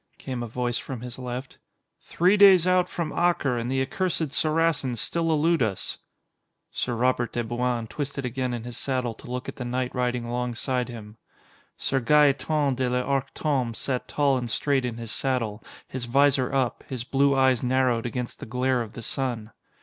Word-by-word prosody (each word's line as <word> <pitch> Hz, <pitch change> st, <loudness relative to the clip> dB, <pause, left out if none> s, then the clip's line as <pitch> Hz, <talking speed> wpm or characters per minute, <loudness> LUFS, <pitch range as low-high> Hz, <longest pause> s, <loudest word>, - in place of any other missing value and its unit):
came 130 Hz, -3 st, -5 dB
a 120 Hz, -, -3 dB
voice 120 Hz, +1 st, -2 dB
from 130 Hz, -4 st, -6 dB
his 125 Hz, 0 st, -8 dB
left. 125 Hz, +1 st, -6 dB, 0.4 s
"Three 180 Hz, +4 st, +2 dB
days 195 Hz, -4 st, +7 dB
out 180 Hz, -1 st, +3 dB
from 165 Hz, -3 st, -3 dB
Acre, 170 Hz, -7 st, +2 dB
and 115 Hz, +1 st, -3 dB
the 135 Hz, 0 st, +2 dB
accursed 160 Hz, 0 st, -1 dB
Saracens 155 Hz, -6 st, +1 dB
still 165 Hz, +6 st, +1 dB
elude 160 Hz, +1 st, +2 dB
us." 105 Hz, -5 st, -2 dB, 0.7 s
Sir 120 Hz, -, -2 dB
Robert 120 Hz, 0 st, +1 dB
de 120 Hz, -, -1 dB
Bouain 120 Hz, 0 st, -1 dB
twisted 140 Hz, +2 st, -4 dB
again 125 Hz, +1 st, -2 dB
in 120 Hz, -2 st, -4 dB
his 120 Hz, 0 st, -7 dB
saddle 130 Hz, -3 st, -1 dB
to 115 Hz, -, -13 dB
look 125 Hz, 0 st, -4 dB
at -, -, -6 dB
the 125 Hz, -, -4 dB
knight 125 Hz, +1 st, -2 dB
riding 125 Hz, -1 st, -1 dB
alongside 125 Hz, +1 st, -2 dB
him. 110 Hz, -2 st, -9 dB, 0.6 s
Sir 135 Hz, -, 0 dB
Gaeton 145 Hz, +1 st, +3 dB
de 130 Hz, -1 st, +1 dB
l'Arc 130 Hz, +2 st, 0 dB
Tombé 130 Hz, -7 st, 0 dB
sat 130 Hz, +1 st, -2 dB
tall 140 Hz, -2 st, +2 dB
and 120 Hz, -1 st, -4 dB
straight 135 Hz, +3 st, +1 dB
in 120 Hz, -2 st, -3 dB
his 115 Hz, -2 st, -6 dB
saddle, 115 Hz, -5 st, -1 dB, 0.2 s
his 130 Hz, -2 st, -5 dB
visor 135 Hz, 0 st, +3 dB
up, 130 Hz, -3 st, 0 dB
his 130 Hz, -4 st, -3 dB
blue 140 Hz, +2 st, +2 dB
eyes 130 Hz, -3 st, +3 dB
narrowed 125 Hz, -2 st, +1 dB
against 125 Hz, 0 st, -5 dB
the -, -, -8 dB
glare 125 Hz, +2 st, +1 dB
of 110 Hz, -3 st, -6 dB
the 115 Hz, -, -8 dB
sun. 120 Hz, -4 st, -3 dB
125 Hz, 180 wpm, -26 LUFS, 120-140 Hz, 0.7 s, days